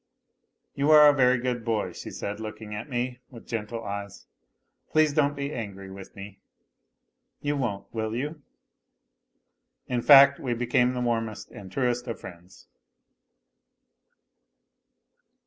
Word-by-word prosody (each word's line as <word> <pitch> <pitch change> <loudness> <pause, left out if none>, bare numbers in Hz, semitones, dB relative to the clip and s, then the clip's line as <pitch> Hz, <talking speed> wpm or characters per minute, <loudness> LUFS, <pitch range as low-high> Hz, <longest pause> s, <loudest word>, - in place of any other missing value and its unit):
" - - -52
You 140 +2 0
are 150 -1 +9
a - - +5
very 130 -2 +4
good 120 -1 -2
boy," 110 -2 -1
she - - -8
said, 105 +1 -5
looking 110 -1 -7
at 105 +6 -6
me 125 0 -3
with 115 -3 -13
gentle 115 0 -4
eyes, 100 -1 -6 0.3
" - - -50
please 155 -2 +3
don't 145 -1 +2
be 140 +1 -4
angry 100 -4 -7
with 95 0 -11
me. 100 0 -10 1.0
You 145 0 0
won't, 110 -8 -3
will 110 -1 -2
you? 150 +5 -4 0.7
" - - -52
In 120 - +1
fact, 140 +1 +8
we 125 -3 -2
became 125 +1 +2
the 125 - -2
warmest 115 -3 -2
and 95 -2 -11
truest 125 0 -1
of 115 - -5
friends. 90 +1 -13
120 Hz, 145 wpm, -26 LUFS, 105-135 Hz, 1.0 s, are